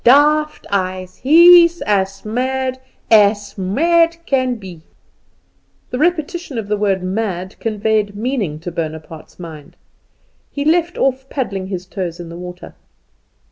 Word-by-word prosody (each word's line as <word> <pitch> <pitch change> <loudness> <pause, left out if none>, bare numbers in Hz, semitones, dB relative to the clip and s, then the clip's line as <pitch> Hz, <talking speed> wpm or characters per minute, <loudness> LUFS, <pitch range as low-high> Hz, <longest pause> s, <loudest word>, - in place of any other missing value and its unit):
Daft 300 +4 +4
eyes; 185 -1 -2
he's 340 +4 +7
as 195 -1 -1
mad 260 +3 -2 0.3
as 205 -1 +4
mad 330 - +2
can 255 -4 +1
be." 185 -7 -10 1.1
This 250 - -2
repetition 340 -3 -1
of 220 -3 -4
the 210 - +2
word 200 -3 0
mad 185 -1 -3
conveyed 215 -1 -1
meaning 215 - -2
to 175 - -5
Bonaparte's 160 -1 -7
mind. 160 -4 -10 0.7
He 285 0 -4
left 340 +2 +1
off 265 0 0
paddling 195 -9 -3
his 185 -2 -5
toes 180 -3 -5
in 170 -1 -8
the 170 - -9
water. 180 0 -9
210 Hz, 130 wpm, -18 LUFS, 185-275 Hz, 1.1 s, he's